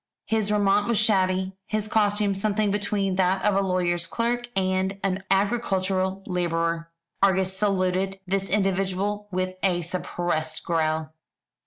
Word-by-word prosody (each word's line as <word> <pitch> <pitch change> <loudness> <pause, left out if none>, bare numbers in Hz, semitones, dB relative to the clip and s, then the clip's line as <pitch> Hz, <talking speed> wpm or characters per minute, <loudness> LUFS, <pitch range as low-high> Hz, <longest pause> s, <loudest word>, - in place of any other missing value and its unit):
His 220 -2 0
raiment 205 0 +3
was 235 -2 +2
shabby; 190 -3 +2
his 215 -1 -2
costume 205 -1 +2
something 205 +1 0
between 200 -2 -1
that 190 +1 +2
of 210 - +4
a 195 - +3
lawyer's 175 -2 0
clerk 240 +4 -1
and 190 0 0
an 190 0 -1
agricultural 195 -2 0
labourer. 165 -2 -1 0.3
Argus 190 -1 +3
saluted 190 -1 0
this 195 +1 -1
individual 195 +1 0
with 185 0 -2
a 175 -3 +1
suppressed 165 -2 -2
growl. 155 -1 0
190 Hz, 130 wpm, -25 LUFS, 185-205 Hz, 0.3 s, of